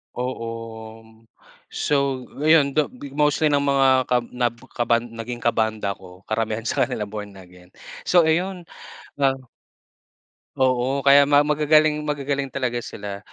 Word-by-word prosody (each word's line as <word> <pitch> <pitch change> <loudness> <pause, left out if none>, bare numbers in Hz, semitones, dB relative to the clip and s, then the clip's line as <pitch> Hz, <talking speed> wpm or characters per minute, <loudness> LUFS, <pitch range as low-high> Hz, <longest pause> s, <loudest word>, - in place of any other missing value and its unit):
Oo. 125 -2 -4 1.4
So - - 0 0.5
ayun, 155 -3 +5
though, 150 0 +1
bi 135 +2 -11
mostly 150 +1 +2
ng 145 - +3
mga 140 -1 +2 0.2
kab 125 -1 +1
na 125 -1 +1 0.3
kaban 120 -1 +2
naging 115 +1 -7
kabanda 110 -3 0
ko, 95 -1 -12
karamihan 110 +1 -2
sakanila 110 -1 -1
Born 105 -1 -7
Again. 90 -1 -16 0.4
So, 175 -2 +5
ayun, 180 +3 0 0.5
ah. 135 -1 +3 1.2
Oo, 130 +1 +1
kaya 140 0 +6
ma 145 0 +5
magagaling 150 +1 +3
magagaling 140 -1 -2
talaga 125 -2 -2
sila. 100 -3 -7
130 Hz, 125 wpm, -22 LUFS, 115-145 Hz, 1.4 s, kaya